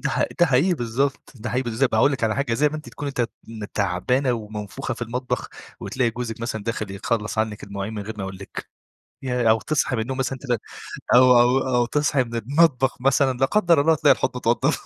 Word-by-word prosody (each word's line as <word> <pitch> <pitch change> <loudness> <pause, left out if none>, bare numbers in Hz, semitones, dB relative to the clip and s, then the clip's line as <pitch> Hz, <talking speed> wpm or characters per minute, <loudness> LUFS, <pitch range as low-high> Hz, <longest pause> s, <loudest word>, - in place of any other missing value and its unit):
ده - - 0
ح - - +1 0.2
ده 175 - +7
حقيقي 150 +7 +3
بالضبط، 135 +3 -2
ده 120 +1 -5
حقيقي 125 +2 0
بالض 120 +2 0
طب 125 - 0
هاقول 135 +6 +4
لِك 130 -4 -1
على 110 - 0
حاجة 140 -4 0
زي 150 +4 +3
ما 155 - -5
أنتِ 150 - -9
تكوني 145 -1 -5
ت 120 -4 -1 0.4
تعبانة 115 +7 +1
ومنفوخة 105 +3 -5
في 120 - -7
المطبخ، 125 +2 -3 0.3
وتلاقي 125 -3 0
جوزِك 115 -1 -5
مثلًا 110 -3 -3
داخل 110 -3 -3
يخلّص 105 +2 -2
عنِك 110 -1 -1
المواعين 100 +2 -5
من 105 - -4
غير 110 +2 -6
ما - - -3
يقول 95 0 -6
لِك، 95 +1 -8 0.6
ياه! 125 -3 +1
أو 110 0 +4
تصحي 150 -3 0
من 110 - -1
النوم 130 +2 -5
مثلًا 135 0 -2
تلاقي 125 -5 -1 0.6
أو 125 0 +7
أو 125 +2 +4 0.2
أو 120 - +3
تصحي 145 -1 +1
من 115 0 -9
المطبخ 135 +2 +2
مثلًا 135 -1 +2
لا 135 - +3
قدّر 175 -6 +3
الله 160 +2 +4
تلاقي 155 - +5
الحوض - - -2
متوضب. - - +1
125 Hz, 220 wpm, -23 LUFS, 110-135 Hz, 0.6 s, ده